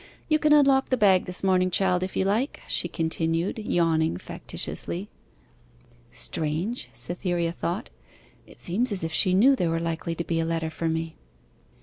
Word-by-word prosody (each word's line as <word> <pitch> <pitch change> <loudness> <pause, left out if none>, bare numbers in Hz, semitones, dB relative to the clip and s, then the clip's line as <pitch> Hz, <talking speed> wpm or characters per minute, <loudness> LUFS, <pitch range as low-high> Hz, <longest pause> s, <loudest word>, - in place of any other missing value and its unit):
'You 310 0 +3
can 300 0 +2
unlock 275 -2 +5
the 255 - +2
bag 195 -4 +4
this 180 +1 -3
morning, 185 -1 +3
child, 180 -1 +2
if 185 +1 -4
you 190 - +1
like,' 220 +8 -1
she - - +1
continued, 165 +3 -1
yawning 165 - +1
factitiously. 185 - -4 1.0
'Strange!' 155 - -2
Cytherea 175 -1 -2
thought; 175 +6 -4 0.6
'it - - -16
seems 225 +8 0
as 190 -4 -3
if 165 0 -3
she 185 +2 +4
knew 260 +8 +6
there 175 -9 0
was 165 0 -1
likely 165 0 -3
to 170 - -3
be 165 -1 -1
a - - +1
letter 165 -1 -2
for 165 +1 -2
me. 160 0 -3
175 Hz, 165 wpm, -26 LUFS, 165-200 Hz, 1.0 s, knew